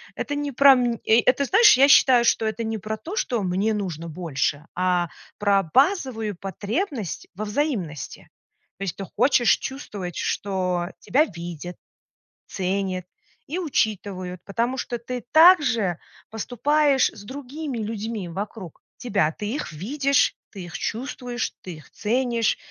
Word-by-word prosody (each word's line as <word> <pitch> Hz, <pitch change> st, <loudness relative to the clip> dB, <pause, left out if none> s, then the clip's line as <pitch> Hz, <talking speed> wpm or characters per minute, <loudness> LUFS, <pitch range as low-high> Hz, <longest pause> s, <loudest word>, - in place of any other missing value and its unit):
Это 290 Hz, -, -3 dB
не 290 Hz, 0 st, -2 dB
про 275 Hz, +1 st, +7 dB
мн 245 Hz, -2 st, +1 dB
и 225 Hz, +2 st, +5 dB
это 260 Hz, +4 st, +2 dB
знаешь, 420 Hz, -, +6 dB
я 275 Hz, +2 st, +7 dB
считаю, 255 Hz, -3 st, +6 dB
что 225 Hz, -, +2 dB
это 220 Hz, +1 st, -2 dB
не 220 Hz, 0 st, -2 dB
про 215 Hz, +1 st, -4 dB
то, 330 Hz, -, -7 dB
что 245 Hz, -, -1 dB
"мне 190 Hz, +4 st, 0 dB
нужно 170 Hz, -6 st, -4 dB
больше", 150 Hz, -3 st, -2 dB
а 180 Hz, -1 st, +1 dB, 0.3 s
про 200 Hz, -1 st, +3 dB
базовую 260 Hz, -, +2 dB
потребность 210 Hz, -, -4 dB
во 215 Hz, +3 st, -4 dB
взаимности. 205 Hz, -, -3 dB, 0.5 s
То 195 Hz, -, -6 dB
есть 185 Hz, -5 st, -3 dB
ты 195 Hz, -, -5 dB
хочешь 245 Hz, +3 st, +3 dB
чувствовать, 205 Hz, -, -6 dB
что 180 Hz, -3 st, -1 dB
тебя 285 Hz, +5 st, +3 dB
видят, 175 Hz, -, -8 dB, 0.7 s
ценят 185 Hz, -1 st, -2 dB, 0.4 s
и 330 Hz, +6 st, -3 dB
учитывают, 195 Hz, -, -2 dB
потому 235 Hz, +5 st, -1 dB
что 240 Hz, -1 st, -3 dB
ты 245 Hz, +1 st, -6 dB
так 335 Hz, +2 st, +8 dB
же 220 Hz, -, 0 dB, 0.3 s
поступаешь 270 Hz, +5 st, +2 dB
с 205 Hz, -, -13 dB
другими 275 Hz, +3 st, -6 dB
людьми 220 Hz, -2 st, -4 dB
вокруг 195 Hz, -1 st, -7 dB, 0.2 s
тебя. 200 Hz, -10 st, 0 dB
Ты 205 Hz, +5 st, -6 dB
их 295 Hz, -, -4 dB
видишь, 275 Hz, -, +1 dB, 0.2 s
ты 190 Hz, -4 st, -8 dB
их 175 Hz, -, -7 dB
чувствуешь, 245 Hz, 0 st, -4 dB
ты 180 Hz, -3 st, -8 dB
их 155 Hz, -, -15 dB
ценишь. 235 Hz, 0 st, 0 dB
220 Hz, 145 wpm, -24 LUFS, 185-260 Hz, 0.7 s, так